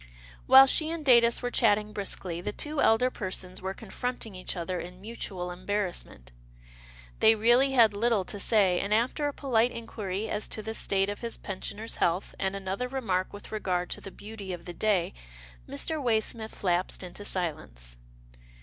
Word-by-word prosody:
While 265 +1 +10
she 310 +3 +2
and 330 -2 -4
Datus 235 -2 +5
were 245 - -1
chatting 210 -2 +2
briskly, 185 -4 -3
the 195 - -3
two 300 +6 -2
elder 250 +3 +4
persons 185 -3 -3
were 190 +1 -4
confronting 230 0 -5
each 185 0 -5
other 175 +1 -3
in 180 +1 -8
mutual 190 -4 -5
embarrassment. 180 - -4 0.9
They 220 0 +6
really 240 +5 +4
had 230 -5 +6
little 215 -2 +1
to 205 - -5
say, 195 -4 +4
and 205 +1 +1
after 255 +6 +1
a - - -1
polite 245 -5 +2
inquiry 215 -3 -4
as 210 0 -2
to 215 - -5
the 220 - -4
state 195 -2 +1
of 205 - -8
his 235 -1 -4
pensioner's 205 +3 -6
health, 175 +3 0
and 190 0 -1
another 195 +5 -3
remark 220 -9 -1
with 205 - -11
regard 180 -4 -2
to - - -3
the - - -8
beauty 205 -1 -8
of 170 -1 -8
the 175 - -6
day, 200 -1 +1 0.6
Mr. 310 - -2
Waysmith 220 -2 -1
lapsed 180 0 0
into 180 +3 -8
silence. 105 - -4
205 Hz, 170 wpm, -28 LUFS, 185-235 Hz, 0.9 s, While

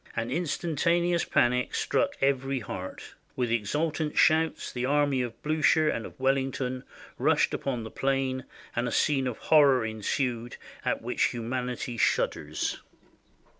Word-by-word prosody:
An 115 +1 -2
instantaneous 170 +2 +1
panic 125 +1 +1
struck - - +1
every 135 0 +1
heart. 95 -2 -7 0.2
With 125 -2 -1
exultant 150 +8 -1
shouts 160 0 +3
the 125 - -4
army 145 -1 +2
of 120 -2 -5
Bliicher 155 0 +3
and 115 - -4
of - - -16
Wellington 130 -1 0 0.4
rushed - - +3
upon 125 -4 -2
the 110 - -8
plain, 135 -1 -1 0.3
and 120 +1 0
a - - -2
scene 135 -3 +2
of 125 - -3
horror 140 -6 +4
ensued 115 +2 -2 0.3
at - - -1
which - - +1
humanity 125 0 -3
shudders." - - 0
130 Hz, 130 wpm, -28 LUFS, 120-145 Hz, 0.4 s, horror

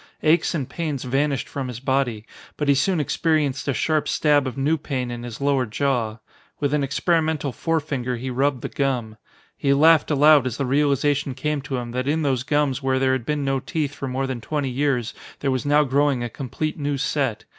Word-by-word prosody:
Aches 160 +2 +3
and 140 -6 -2
pains 155 -6 -3
vanished 135 0 0
from 135 -2 -4
his 120 -2 -6
body, 130 -5 -1 0.3
but 150 - -2
he 140 - +6
soon 170 +6 +1
experienced 150 -2 0
a 140 - +1
sharp 155 +6 +1
stab 145 -3 +2
of 130 - -5
new 145 +4 +2
pain 130 -5 -3
in 120 0 -5
his 120 -1 -7
lower 140 -3 +1
jaw. 115 -2 -1 0.4
With 145 -1 0
an 150 -1 +2
experimental 155 0 0
forefinger 145 -5 -2
he 130 +2 -4
rubbed 130 0 0
the - - -1
gum. 125 -6 -2 0.4
He 140 0 +2
laughed 160 +2 +5
aloud 150 -2 +5
as 125 0 -4
the 140 - -1
realization 140 0 +1
came 150 +2 -2
to 135 -1 -4
him 120 -1 -5
that 130 +2 -2
in 155 +2 +1
those 135 -4 +1
gums 145 0 0
where 135 -1 +1
there 130 0 +2
had 130 -3 -3
been 150 -2 -1
no 135 0 +1
teeth 145 +1 -3
for 135 - -5
more 130 +1 -1
than 130 -3 -4
twenty 145 -1 -2
years 125 -3 0 0.3
there 140 - +1
was 130 +2 -2
now 145 +1 +5
growing 140 -2 +1
a 120 - -3
complete 155 +6 -4
new 145 -1 -1
set. 135 -4 -1
140 Hz, 210 wpm, -23 LUFS, 130-150 Hz, 0.4 s, he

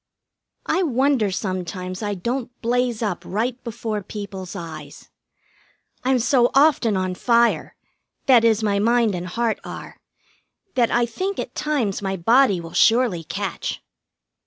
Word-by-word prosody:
I 370 - +1
wonder 265 - +2
sometimes 185 0 -4
I 205 -1 -2
don't 240 +6 -3
blaze 240 -1 0
up 200 -5 -2
right 235 +6 -2
before 225 -2 -4
people's 195 -2 -7
eyes. 155 -4 -9 0.9
I'm 260 0 +3
so 245 0 +3
often 270 -8 +4
on 185 -1 -1
fire 235 +5 +2 0.5
that 250 -4 +6
is, 225 -1 +3
my 200 -1 +1
mind 230 0 +3
and 180 0 -4
heart 230 +4 -1
are - - -9 0.8
that 240 -3 +2
I 240 0 +2
think 370 - -3
at - - -5
times 265 -11 -1
my 195 -1 -2
body 225 +1 +4
will 165 -1 -9
surely 225 -7 +3
catch. - - -4
225 Hz, 135 wpm, -22 LUFS, 190-245 Hz, 0.9 s, that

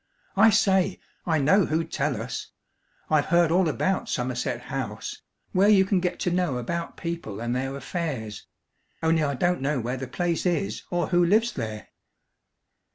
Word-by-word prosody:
I 215 +3 +7
say, 190 -2 +2 0.3
I 160 -2 +3
know 180 +7 +4
who'd 160 +1 -1
tell 140 -5 -1
us. 115 +2 -5 0.6
I've 155 -2 +3
heard 170 -1 +4
all 175 -1 +3
about 190 +5 -1
Somerset 125 -1 -2
House 120 -5 -5 0.3
where 195 +3 +4
you 195 -2 +6
can 195 -1 +2
get 180 0 -2
to 180 - +1
know 175 -7 0
about 170 +8 -4
people 165 - -5
and 120 +1 -2
their 135 +1 -2
affairs 140 - -4 0.6
only 160 0 +3
I 140 -2 0
don't 175 +2 +1
know 140 0 0
where 125 +2 -3
the 130 0 -5
place 170 +5 -1
is, 145 - -1
or 175 -1 -1
who 175 -1 +4
lives 220 +7 +3
there." 110 -4 -5
160 Hz, 165 wpm, -26 LUFS, 125-180 Hz, 0.6 s, I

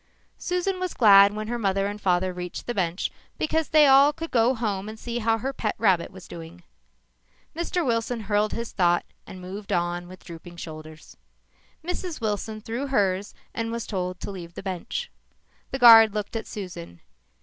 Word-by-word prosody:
Susan 360 +1 -1
was 365 -1 -3
glad 200 -3 +7
when 215 0 -4
her 240 +1 -3
mother 195 -2 +1
and 205 +1 -4
father 185 -1 +1
reached 180 0 -6
the 240 - -2
bench 180 -3 -1 0.3
because 315 0 0
then 305 -1 +6
they - - +7
all 275 +1 +7
could 330 +2 -7
go 240 +2 +3
home 210 -3 -2
and 220 - -8
see 235 +1 -4
how 225 0 +2
her 265 +5 -3
pet 215 -4 -2
rabbit 190 -6 +2
was 185 -2 -13
doing. 165 - -10 0.9
Mr. 340 0 -1
Wilson 230 -1 -1
hurled 210 0 +1
his 230 0 -4
thought 175 -2 +2 0.2
and 185 - -9
moved 195 +3 -8
on 175 0 -1
with 185 0 -13
drooping 170 +1 -11
shoulders. 155 -1 -10 0.7
Mrs. 355 -1 -4
Wilson 215 0 -3
threw 235 +6 -4
hers 200 -6 0 0.2
and 230 0 -3
was 235 -1 -4
told 180 -2 -3
to - - -5
leave 175 -3 -9
the - - -7
bench. 190 - -4 0.6
The 265 - -3
guard 225 -4 +8
looked 210 +2 -4
at 225 - -4
Susan. 85 - -8
210 Hz, 185 wpm, -25 LUFS, 180-240 Hz, 0.9 s, guard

